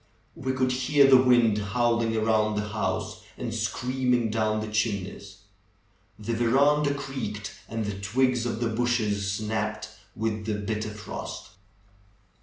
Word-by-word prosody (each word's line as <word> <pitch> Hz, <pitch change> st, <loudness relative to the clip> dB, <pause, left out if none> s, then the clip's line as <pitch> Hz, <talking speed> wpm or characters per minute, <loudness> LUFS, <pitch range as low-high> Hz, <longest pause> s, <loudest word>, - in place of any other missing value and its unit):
We 130 Hz, +1 st, -2 dB
could 130 Hz, 0 st, +1 dB
hear 135 Hz, +3 st, +4 dB
the 130 Hz, -1 st, +7 dB
wind 120 Hz, -4 st, +4 dB
howling 115 Hz, +2 st, +1 dB
around 110 Hz, -1 st, +2 dB
the 105 Hz, 0 st, -2 dB
house 105 Hz, 0 st, -2 dB, 0.2 s
and -, -, -4 dB
screaming 125 Hz, -2 st, 0 dB
down 110 Hz, -1 st, +1 dB
the 110 Hz, -, -4 dB
chimneys. 100 Hz, -2 st, -3 dB, 0.8 s
The 110 Hz, +2 st, -3 dB
veranda 140 Hz, +5 st, +3 dB
creaked, 110 Hz, -8 st, -5 dB, 0.2 s
and 115 Hz, -1 st, -2 dB
the 100 Hz, -1 st, -4 dB
twigs 125 Hz, +3 st, +1 dB
of 115 Hz, -1 st, -3 dB
the 115 Hz, -, +1 dB
bushes 110 Hz, -4 st, 0 dB
snapped 110 Hz, +1 st, -2 dB, 0.3 s
with 110 Hz, -1 st, -2 dB
the 110 Hz, -, 0 dB
bitter 105 Hz, +1 st, -3 dB
frost. 105 Hz, 0 st, -7 dB
110 Hz, 135 wpm, -27 LUFS, 105-125 Hz, 0.8 s, the